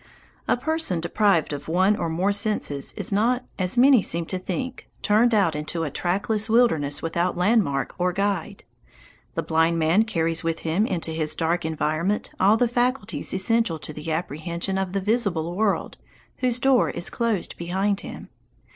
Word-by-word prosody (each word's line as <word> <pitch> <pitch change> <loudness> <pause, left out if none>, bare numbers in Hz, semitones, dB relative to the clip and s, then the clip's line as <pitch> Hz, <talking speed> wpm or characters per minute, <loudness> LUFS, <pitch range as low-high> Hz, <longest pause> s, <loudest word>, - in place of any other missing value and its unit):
A - - +2
person 315 - -1
deprived 170 -1 +1
of 145 0 -6
one 185 +5 +3
or 170 - -2
more 180 +5 +1
senses 205 - -1
is 200 - -1
not, 240 +5 +1
as 185 +5 -1
many 260 -1 +6
seem 170 -2 -2
to 185 +2 -4
think, 255 +7 -5
turned 220 +3 +4
out 195 -8 +2
into 155 +2 -3
a 150 - -3
trackless 200 - -1
wilderness 160 -12 +2
without 170 +2 -1
landmark 180 - +1
or 180 +1 +2
guide. 195 -2 -2 0.7
The - - -1
blind 160 +1 +2
man 165 +7 +3
carries 165 -6 -1
with 165 0 -2
him 175 +7 0
into 170 -3 -3
his 160 -1 -1
dark 170 +1 0
environment 160 +5 -1
all 200 +4 +5
the 245 - +2
faculties 245 -2 -1
essential 225 -3 +1
to 155 +1 -8
the 155 +2 -5
apprehension 170 +4 -3
of 190 -1 -3
the 195 - 0
visible 190 -6 0
world 210 0 0 0.4
whose 250 -1 0
door 265 -1 +3
is 175 - -4
closed 230 -6 -1
behind 190 +4 -1
him. - - -9
185 Hz, 165 wpm, -24 LUFS, 165-220 Hz, 0.7 s, many